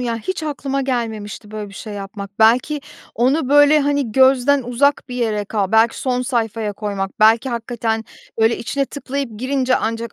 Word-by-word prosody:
Ya, 235 -2 -2
hiç 370 - -4
aklıma 275 -2 -2
gelmemişti 220 -5 -4
böyle 215 -1 -6
bir 200 - -14
şey 215 +2 -8
yapmak. 200 0 -8
Belki 245 +7 +3 0.3
onu, 260 +4 +1
böyle, 290 +2 +6
hani, 285 -5 0
gözden 265 +2 +4
uzak 270 +5 +1
bir 250 - -6
yere 220 -4 -1
kal 200 -1 -2
belki 225 +1 +4
son 250 -1 0
sayfaya 225 -4 -2
koymak, 200 -1 -4
belki 225 +4 +5
hakikaten, 230 -2 -2 0.4
böyle, 225 +1 +3
içine 275 +5 -1
tıklayıp 280 -1 -5
girince 260 +1 +1
ancak 230 0 -3
235 Hz, 165 wpm, -19 LUFS, 220-270 Hz, 0.4 s, böyle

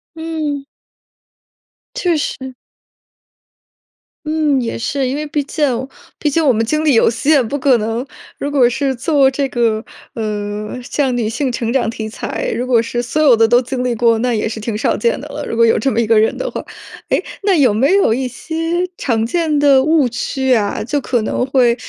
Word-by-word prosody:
嗯。 310 -3 -4 1.3
确 355 -9 +1
实。 265 -3 -4 1.7
嗯， 305 -3 +1
也 230 - -3
是， 265 +3 -1
因 265 - -2
为 300 +1 -3
毕 295 0 -1
竟 295 +2 -1 0.5
毕 300 - +1
竟 320 +2 +1
我 265 - +5
们 225 0 +1
精 305 +7 -1
力 295 - +4
有 225 - +4
限， 265 +3 +2
不 285 - -2
可 265 -2 +3
能 225 +3 -2 0.3
如 285 - -3
果 260 -4 +4
是 270 +2 -1
做 270 +2 +2
这 275 0 -1
个， 230 -3 0 0.3
呃， 210 0 -4
像 265 0 -1
女 230 -3 0
性 255 +4 -1
成 235 -1 -2
长 260 -4 +1
题 220 -1 -5
材， 220 - -4
如 250 +2 -3
果 245 -2 +4
是 235 +1 -2
所 245 +5 -3
有 270 -5 +6
的 225 0 +4
都 240 +2 +5
经 250 0 -3
历 245 -1 0
过， 230 0 +3
那 250 +2 0
也 215 - -1
是 220 0 -5
挺 215 0 -3
少 220 - 0
见 475 +1 0
的 - - -8
了， - - -6
如 - - -3
果 230 0 +4
有 225 - +3
这 265 +5 0
么 230 - 0
一 235 - +2
个 220 0 +4
人 220 - +1
的 - - -3
话。 - - -5 0.5
诶， - - +1 0.2
那 395 -2 +3
有 265 -9 +4
没 265 - +2
有 390 - +3
一 255 +2 -1
些 250 +6 -9 0.4
常 225 -8 -1
见 315 +3 0
的 280 -2 +5
误 310 -2 +3
区 260 +2 -1
啊？ 210 -4 0
就 285 +6 -1
可 245 -3 -1
能 230 - -1
会 250 -3 +3
255 Hz, 220 characters per minute, -17 LUFS, 230-290 Hz, 1.7 s, 有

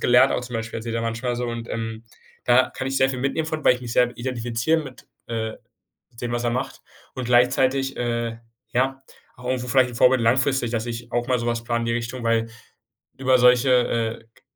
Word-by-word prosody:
gelernt.” 125 0 +5
auch - - -1
zum 125 -1 -8
Beispiel 115 0 -4
erzählt 115 0 -5
er 115 - -1
manchmal 120 +2 -2
so, 125 - -2
und, 115 -1 -5
ähm, 115 0 -4 0.4
da 125 +1 +4
kann 135 - -5
ich 135 - -2
sehr 135 0 +3
viel 130 - -4
mitnehmen 140 +5 -1
von, 155 -1 -4
weil 125 - +6
ich 125 - -8
mich 120 -2 -6
sehr 125 0 +2
identifiziere 120 +4 -1
mit, 135 -4 -11 0.2
äh, 110 -1 -3 0.7
dem, 120 -1 -3
was 120 0 -2
er 120 - +1
macht. 130 +3 -4 0.3
Und 130 -2 -4
gleichzeitig, 130 +2 +2
äh, 115 -1 -2 0.3
ja, 135 +2 0 0.4
auch 125 - -13
irgendwo 125 -1 -1
vielleicht 125 0 +4
'n - - -10
Vorbild 125 +1 +5
langfristig, 130 +1 +2
dass 115 0 -2
ich 120 0 -6
auch 120 0 0
mal 125 -1 +2
sowas 115 0 -2
plane 120 0 0
in 115 - -3
die 115 - 0
Richtung, 120 +1 -4
weil 115 0 +1 0.7
über 130 -1 +3
solche, 125 +1 +5
äh, 115 -2 +1
K - - -26
120 Hz, 215 wpm, -23 LUFS, 115-130 Hz, 0.7 s, weil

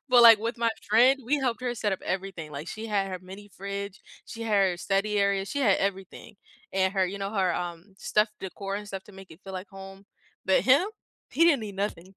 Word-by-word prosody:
But, 250 -2 +7
like, 230 -2 +10
with 230 +3 -3
my 230 0 +2
friend, 250 +6 +4
we 290 +5 +2
helped 250 -2 -1
her 245 -1 -1
set 210 -3 -1
up 190 - -3
everything, 185 -5 -4
like, 145 +4 -6
she 220 +1 -6
had 200 -3 0
her 185 -1 -5
mini 195 +3 -11
fridge, 200 +1 -6 0.2
she 230 - -8
had 210 -3 +2
her 175 - -4
study 200 +3 0
area, 200 -1 +2
she 285 +7 -3
had 205 -7 +4
everything, 195 +1 -4 0.4
and 190 0 +1
her, 190 -2 +2
you 195 +2 -5
know, 195 0 -3
her, 190 -4 +1
um, 175 +2 -6
stuff, 210 +1 +2
decor 195 +1 -5
and 210 0 -7
stuff 195 -1 -6
to 210 - -15
make 190 -1 -13
it 160 - -14
feel 195 - -9
like 185 +1 -6
home. 195 0 -11 0.4
But 190 - +3
him, 275 +9 +5 0.4
he 335 - +3
didn't 300 -7 +4
need 205 -3 -7
nothing. 195 -2 -4
200 Hz, 230 wpm, -27 LUFS, 190-220 Hz, 0.4 s, like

